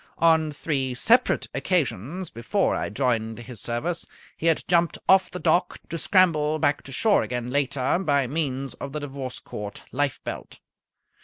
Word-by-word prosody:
On 160 -2 +4
three 135 -4 -2
separate 240 - +3
occasions 170 - -1
before 150 - 0
I - - -2
joined 115 -4 -1
his 120 -2 -4
service 160 +9 -2 0.3
he 165 - -2
had 165 - +3
jumped 170 -1 +2
off 190 0 +5
the - - -6
dock, 175 0 +1
to 165 - -3
scramble 155 -5 +3
back 145 -1 +1
to 135 - -8
shore 205 - +3
again 125 0 -3
later 140 +2 +1
by 145 -7 +2
means 135 -1 -2
of 140 -1 -7
the 150 - -2
Divorce 135 -3 -6
Court 105 -1 -7
lifebelt. 140 +1 -3
145 Hz, 155 wpm, -25 LUFS, 130-170 Hz, 0.3 s, off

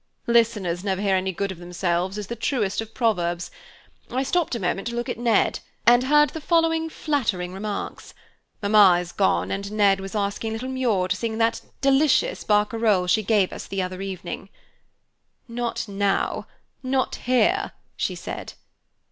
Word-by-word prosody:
"'Listeners 210 -7 +2
never 190 -2 -1
hear 200 -1 +2
any 190 0 0
good 195 +2 -3
of 180 - -9
themselves' 175 +2 -2
is 210 - -4
the 235 - -5
truest 225 -4 -1
of 225 0 -8
proverbs. 175 -7 0 0.6
I 260 +2 -1
stopped 335 -1 0
a - - -3
moment 195 +2 -1
to 235 - -4
look 240 0 -3
at - - -4
Ned, 235 -3 +2 0.3
and 240 +2 +6
heard 295 +2 +4
the 320 - -6
following 325 0 +2
flattering 220 - -1
remarks. 205 +1 -5 0.5
Mamma 200 -3 +6
is 175 -1 -6
gone, 195 - +1
and 200 +1 -3
Ned 200 -2 +3
was 195 +2 -7
asking 205 +2 -2
little 240 +4 -4
Muir 235 -8 +1
to 185 - +2
sing 220 +1 -3
that 230 0 +1 0.2
delicious 275 +1 +3
barcarole 210 -2 +2
she 200 +5 +3
gave 205 -2 +2
us - - -7
the 195 -1 -2
other 185 +1 -5
evening. 190 -1 -6 1.0
"'Not 235 -1 -3
now, 200 -1 -1 0.3
not 260 0 0 0.2
here,' 345 +11 +2 0.2
she - - -2
said. - - -7
210 Hz, 165 wpm, -24 LUFS, 190-240 Hz, 1.0 s, and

